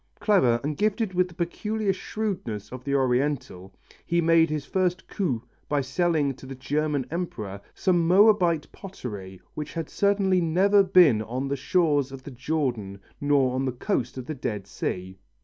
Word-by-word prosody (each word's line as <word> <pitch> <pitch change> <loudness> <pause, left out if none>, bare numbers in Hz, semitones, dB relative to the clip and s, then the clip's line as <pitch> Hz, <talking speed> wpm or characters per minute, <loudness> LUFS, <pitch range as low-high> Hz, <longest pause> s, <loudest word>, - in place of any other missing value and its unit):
Clever 190 - +3
and 150 +1 -2
gifted 215 -1 0
with 180 0 +2
the 175 - -16
peculiar 210 +4 -1
shrewdness 185 - -4
of 130 0 -8
the 140 +1 -1
Oriental, 130 -7 0 0.3
he 170 - 0
made 165 -1 +4
his 150 -2 -3
first 185 +1 -1
coup 135 - -2 0.3
by 145 -1 +1
selling 145 0 +1
to 135 0 -13
the 135 - -7
German 145 +1 -1
Emperor 110 - -4
some 175 -3 +2
Moabite 180 -4 +4
pottery 105 - -8
which 150 -1 -6
had 165 -2 -4
certainly 195 -2 +2
never 190 +5 +4
been 175 - +5
on 125 +5 -3
the 140 - 0
shores 145 -2 +1
of 135 -1 -9
the 140 - -8
Jordan 125 -7 -2 0.2
nor 140 -3 +3
on 130 +1 -1
the 130 - 0
coast 125 0 -2
of 130 - -5
the 155 - -4
Dead 105 -8 -4
Sea. 95 -1 -5
150 Hz, 165 wpm, -26 LUFS, 125-180 Hz, 0.3 s, been